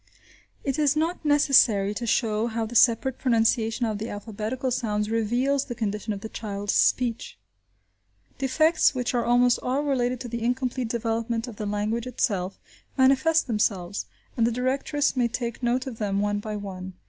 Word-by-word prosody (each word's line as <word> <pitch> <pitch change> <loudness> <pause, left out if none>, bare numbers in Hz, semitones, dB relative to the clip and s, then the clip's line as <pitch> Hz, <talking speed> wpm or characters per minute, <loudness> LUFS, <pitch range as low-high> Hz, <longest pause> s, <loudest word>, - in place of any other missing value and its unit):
It 275 +1 -1
is 295 -1 +3
not 330 +3 -1
necessary 265 -9 +4
to 235 +3 -4
show 220 -1 +1
how 225 -1 -2
the 220 - -8
separate 245 +2 +3
pronunciation 230 -1 +1
of 215 -2 -2
the 220 - -4
alphabetical 220 +5 -4
sounds 210 -3 -1
reveals 245 +5 +1
the 240 - -6
condition 215 -1 -3
of 200 -1 -4
the 220 - -5
child's 205 -2 -4
speech. 240 -2 +1 1.0
Defects, 310 +3 +3
which 250 0 -1
are 240 -1 +1
almost 245 +1 +3
all 265 +3 -1
related 255 -3 0
to 250 - -5
the 235 0 -5
incomplete 250 +1 -1
development 230 +1 -2
of 225 -4 -9
the 210 - -4
language 215 +4 -2
itself, 195 -6 -1 0.4
manifest 275 +5 +4
themselves, 205 -5 -1 0.3
and 230 -1 +2
the - - 0
directress 270 +4 0
may 245 -2 +2
take 235 0 -4
note 245 +1 0
of 250 -4 -7
them 200 -2 -1
one 205 0 0
by 215 0 -5
one. 190 -2 -7
235 Hz, 170 wpm, -25 LUFS, 215-255 Hz, 1.0 s, necessary